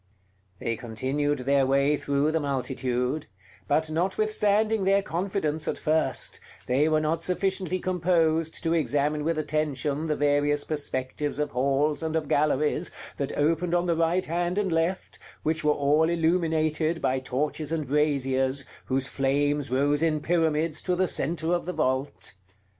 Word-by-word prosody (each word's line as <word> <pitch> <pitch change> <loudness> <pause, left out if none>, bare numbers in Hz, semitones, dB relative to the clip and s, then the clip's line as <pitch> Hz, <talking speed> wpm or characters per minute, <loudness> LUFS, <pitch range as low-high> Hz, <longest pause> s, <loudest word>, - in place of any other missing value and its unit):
They 115 +2 -2
continued 130 +6 -1
their 140 -1 +3
way 140 +2 +3
through 145 +1 0
the 160 - +1
multitude; 130 -1 -2 0.4
but 155 +6 +1
notwithstanding 210 +4 +1
their 195 +1 +3
confidence 170 -4 -2
at - - -1
first, 155 +1 -1 0.3
they 140 +5 +2
were 155 0 +3
not 155 +2 0
sufficiently 185 +1 0
composed 165 -3 +1
to 165 -1 +1
examine 150 -2 +1
with 165 +1 0
attention 150 -1 -1
the 155 - 0
various 145 0 +2
perspectives 145 -1 -3
of 150 0 -1
halls 140 +4 +1
and 160 0 -2
of 155 -2 -1
galleries 150 +3 +1 0.3
that 140 - -3
opened 165 +4 +1
on 175 0 +1
the 170 -1 +1
right 165 +3 +1
hand 175 +3 -1
and 200 -3 0
left, 165 +3 -1 0.2
which 155 0 0
were 150 - +4
all 150 +3 +2
illuminated 160 -1 +1
by 130 -2 0
torches 145 +4 -2
and 160 -2 -1
braziers, 135 -2 +1 0.2
whose 135 0 0
flames 145 +1 0
rose 145 +3 +1
in 160 -2 +2
pyramids 160 -1 0
to 180 - 0
the 185 +1 +1
centre 160 +2 0
of 175 0 -1
the 180 - -2
vault. 130 - -1
155 Hz, 150 wpm, -26 LUFS, 140-165 Hz, 0.4 s, were